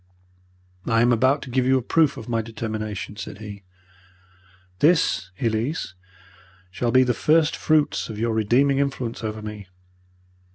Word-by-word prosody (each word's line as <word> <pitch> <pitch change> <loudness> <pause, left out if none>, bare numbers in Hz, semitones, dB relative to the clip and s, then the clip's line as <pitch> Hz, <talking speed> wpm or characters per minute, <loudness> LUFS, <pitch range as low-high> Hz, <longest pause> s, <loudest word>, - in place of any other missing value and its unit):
"'I 115 -1 +3
am 120 0 +4
about 130 +5 +2
to 130 - -9
give 130 +1 +2
you 130 0 +4
a - - -1
proof 150 +1 +2
of 115 - -8
my 115 -1 0
determination,' 110 -2 -5
said 100 - -7
he. 100 -2 -9 1.2
'This, 150 - +2
Elise, 115 - -1 0.8
shall 110 +6 -2
be 130 +2 +5
the 125 -1 +1
first 155 +5 +2
fruits 155 -5 +1
of 110 - -6
your 115 +1 0
redeeming 125 +6 +2
influence 130 -4 -2
over 110 -1 -4
me. 105 -2 -8
120 Hz, 150 wpm, -23 LUFS, 110-135 Hz, 1.2 s, be